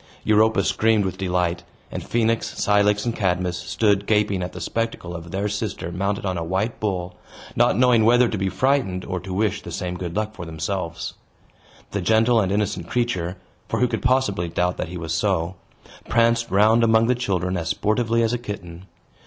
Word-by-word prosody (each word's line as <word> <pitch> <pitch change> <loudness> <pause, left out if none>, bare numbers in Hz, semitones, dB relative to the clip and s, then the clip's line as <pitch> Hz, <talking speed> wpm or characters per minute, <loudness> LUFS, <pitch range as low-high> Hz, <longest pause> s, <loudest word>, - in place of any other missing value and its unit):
Europa 110 -2 +3
screamed 110 0 +2
with 95 - -4
delight; 90 -2 0 0.3
and - - -5
Phoenix, 115 -1 0
Cilix, 105 +1 +3
and 120 -1 -1
Cadmus 90 -3 0
stood 100 +2 +1
gaping 105 -3 +2
at 90 - -4
the - - -8
spectacle 115 -6 -3
of 85 0 -8
their 100 +3 -2
sister 105 -4 -3
mounted 100 +3 -2
on 90 -2 -1
a - - -3
white 95 +7 -2
bull, 90 -4 -2 0.4
not - - +3
knowing 125 -3 +5
whether 120 +2 +5
to 115 - -3
be 95 -1 -1
frightened 95 -3 0
or 90 -1 -3
to 95 +2 -8
wish 105 +1 0
the - - -9
same 90 -1 -4
good 90 -1 -5
luck 110 0 -1
for 90 - -8
themselves. 85 +1 -4 0.8
The 100 - -2
gentle 110 +4 +3
and 95 -1 -1
innocent 100 -4 -1
creature 95 -7 -1 0.3
(for - - -1
who 125 - +3
could 115 -2 -3
possibly 125 -9 +1
doubt 90 +2 0
that - - -3
he 90 - -6
was 80 -2 -4
so?) 85 -1 0 0.6
pranced 115 0 +2
round 110 +4 +4
among 110 0 +4
the 125 - +3
children 95 -7 -1
as 85 -2 -2
sportively 115 +2 +1
as 115 +1 +1
a 120 - -1
kitten. 95 -5 -8
100 Hz, 190 wpm, -23 LUFS, 90-115 Hz, 0.8 s, knowing